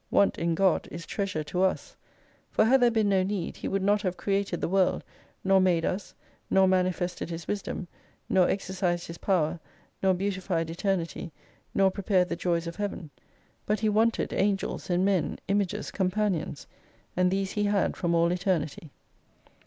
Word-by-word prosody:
Want 200 - +3
in 170 0 +1
God 190 -1 +2
is 165 -1 -7
treasure 190 -3 -2
to 180 +5 -2
us. 190 0 0 0.5
For - - +3
had 260 +3 +5
there 245 - +6
been 220 -3 +2
no 190 -1 +3
need 190 -2 -3
He - - -5
would 195 0 -1
not 205 +1 +3
have 185 -3 -2
created 195 -3 -1
the - - -1
World, 190 +1 +2 0.4
nor 195 0 +4
made 175 -3 +2
us, 190 +1 -3 0.3
nor 190 0 +5
manifested 180 -2 0
His 165 -2 -6
wisdom, 200 -2 -3 0.4
nor 185 -2 +3
exercised 185 -2 -1
His 170 - -9
power, 175 -3 +1 0.4
nor 190 -1 +3
beautified 185 -4 -2
Eternity, 175 -2 -2 0.4
nor 195 -1 +4
pre 200 - -6
pared 185 -2 +2
the - - -1
Joys 170 -1 0
of 170 0 -6
Heaven. 200 -7 -4 0.6
But 210 +1 0
he 215 - +2
wanted 220 +2 +1
Angels 195 -1 -1
and 180 +1 +2
Men, 190 -6 +1
Images, 200 -1 -1
Companions: 190 -6 -1 0.5
And 180 0 +3
these 195 0 -1
He 210 -1 0
had 205 -2 +1
from 170 -2 0
all 170 +1 +3
Eternity. 175 -4 -1
185 Hz, 170 wpm, -28 LUFS, 175-200 Hz, 0.6 s, there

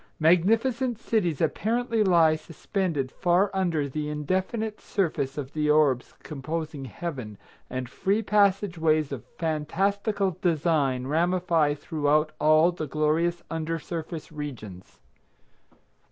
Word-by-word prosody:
Magnificent 225 +9 +3
cities 185 - 0
apparently 225 +7 +1
lie 170 -5 +5
suspended 155 -3 -3
far 185 +2 +2
under 170 -6 0
the 150 +2 -4
indefinite 190 - -2
surface 150 -8 -1
of 140 -1 -5
the 150 -1 0
orbs 150 -5 +2
composing 155 0 -5
Heaven, 125 -6 -6 0.3
and 130 -1 -4
free 200 - 0
passage 200 -3 +2
ways 155 -2 +2
of 135 -4 -5
phantastical 190 +5 -1
design 150 -6 +1
ramify 165 0 +2
throughout 150 0 +1
all 155 +3 +5
the 165 -3 -5
glorious 155 +4 0
under 165 0 -2
surface 165 0 -6
regions. 120 - -8
160 Hz, 110 wpm, -26 LUFS, 150-185 Hz, 0.3 s, lie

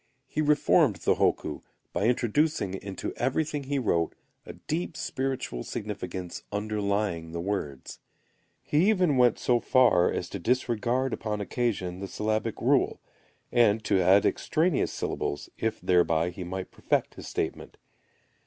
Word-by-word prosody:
He 155 - -2
reformed 150 - +4
the 85 - +2
hokku, - - 0 0.3
by - - 0
introducing 120 - +1
into 95 0 -5
everything 145 +3 -1
he 140 +1 -1
wrote 85 -10 0 0.3
a - - -7
deep 165 +1 -4
spiritual 130 - -3
significance 90 -2 -5
underlying 100 -5 -1
the 85 - -3
words. 85 -8 -4 0.6
He 160 +8 +3
even 180 -9 +3
went 125 -3 +4
so 120 -1 +2
far 115 -9 +4
as 90 - -3
to 100 - -5
disregard 125 +3 0
upon 105 -1 -3
occasion 100 -5 -2
the 100 - -5
syllabic 110 +2 -2
rule, - - +2 0.5
and 115 -3 +4
to 100 -2 +2
add 95 +3 +5
extraneous 165 -2 +1
syllables, 70 - -3
if 110 -1 -1
thereby 85 -1 +2
he 90 +1 -7
might 95 +1 -5
perfect - - -1
his - - -10
statement. - - -4
110 Hz, 135 wpm, -28 LUFS, 95-130 Hz, 0.6 s, add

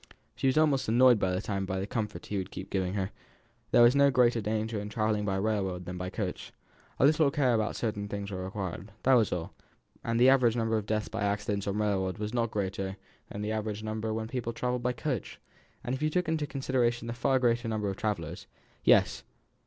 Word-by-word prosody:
She 120 +3 0
was 130 - +2
almost 145 -6 +3
annoyed 120 0 +6
this 95 0 0
time 100 -2 -2
by 95 0 -2
the 95 - -2
comfort 110 -1 -4
he 105 - -3
would 95 - -5
keep 95 +1 -8
giving 95 0 -1
her; 95 -1 -2 0.6
there 120 - +6
was 120 +3 +6
no 140 0 +6
greater 125 -3 +3
danger 110 +1 -2
in 105 0 -5
travelling 105 0 0
by 95 -1 0
railroad 95 -3 -1
than 90 +1 -5
by 90 0 -3
coach, 95 -2 -4 0.5
a - - +4
little 155 0 +4
care 135 -3 +2
about 110 -2 0
certain 105 -3 -2
things 100 0 -5
was 95 - -4
required, 95 0 -5
that 135 - +5
was 115 -4 +4
all, 85 -2 -3 0.5
and 115 0 0
the 125 - +6
average 125 -4 +5
number 115 -1 0
of 105 -1 -2
deaths 110 -1 -1
by 110 - -5
accidents 100 0 -1
on 100 +1 -1
railroads 100 -3 0
was 105 +1 -4
not 115 -2 +1
greater 95 -1 -3 0.3
than 105 - -5
the 105 - -2
average 110 -1 -3
number 110 0 -3
when 110 0 -3
people 120 -1 -3
travelled 125 +1 -2
by 125 +1 +1
coach, 125 -1 -4 0.5
if 130 +3 -2
you 155 - +2
took 180 +2 0
into 160 -2 0
consideration 125 -4 0
the 115 - -3
far 135 +2 +2
greater 120 -2 +1
number 110 -2 -1
of 100 - -2
travellers. 90 -5 -3 0.4
Yes! - - +4
110 Hz, 215 wpm, -29 LUFS, 100-125 Hz, 0.6 s, annoyed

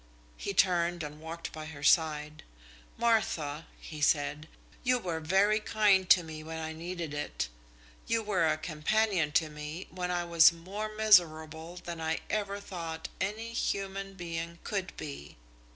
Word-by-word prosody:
He - - -4
turned 175 -2 +3
and 150 +1 -7
walked 165 +1 -6
by 155 0 -6
her 145 -2 -9
side. 150 -1 +3 0.6
"Martha," 170 -10 +1
he 155 -1 -8
said, 150 0 +2 0.4
"you 250 0 +3
were 175 -8 -3
very 195 +6 +3
kind 205 -4 +3
to 180 - +7
me 155 -1 -7
when 160 +1 -6
I 160 0 -4
needed 170 -1 -5
it, 145 - -3 0.6
you 230 -1 +1
were 190 -6 +2
a 155 0 +2
companion 170 +2 +1
to 160 0 +3
me 150 +3 -7
when 180 -1 -3
I 175 -1 0
was 170 -1 +7
more 190 +6 -5
miserable 165 -6 +3
than 170 -2 -6
I 160 0 -1
ever 200 -1 -1
thought 165 -5 -6
any 220 +4 -3
human 195 -3 -2
being 170 -1 -5
could 195 -2 -2
be. 140 - -8
170 Hz, 150 wpm, -31 LUFS, 155-195 Hz, 0.6 s, to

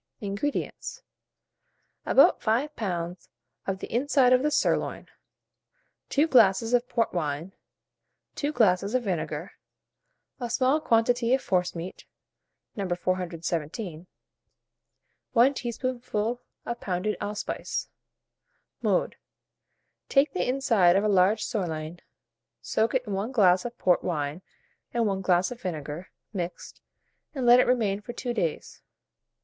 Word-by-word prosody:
INGREDIENTS. 205 +8 -4 1.0
About - - +5
5 255 +7 0
lbs. 175 -4 -4 0.4
of 195 -1 -1
the - - -8
inside 255 0 +4
of 250 - +5
the 300 - +2
sirloin, - - 0 1.0
2 290 +2 +3
glasses 225 -4 +4
of 245 +1 +2
port 230 -2 0
wine, 160 +1 -3 0.8
2 290 0 -2
glasses 205 -4 +2
of 255 - +1
vinegar, 170 -4 -3 0.9
a 240 -2 -3
small 260 +5 +2
quantity 235 0 +3
of 265 - -3
forcemeat 180 -1 -2 0.7
(No. 195 -3 -3
417), 175 0 -3 1.3
1 250 +4 +5
teaspoonful 240 -2 -3 0.2
of 235 0 -4
pounded 190 +3 -1
allspice. 205 0 -3 0.9
Mode. - - +1 0.9
Take 275 +2 +3
the 365 - -1
inside 225 -9 +3
of 195 - +3
a - - +2
large 200 +2 +3
sirloin, 170 -6 -3 0.6
soak 220 - 0
it 250 -1 +1
in 205 - -4
1 200 +5 -2
glass 185 -6 +4
of 240 0 -6
port 180 -1 +2
wine 150 -1 -2 0.5
and 235 -1 +2
1 195 -2 0
glass 180 +1 +2
of 245 - -8
vinegar, 155 -1 -5 0.2
mixed, 175 -3 -6 0.5
and 260 -3 -2
let 240 +1 +8
it - - +4
remain 215 -5 +1
for 240 - -8
2 245 0 -3
days. 170 -9 -3
210 Hz, 120 wpm, -27 LUFS, 180-245 Hz, 1.3 s, let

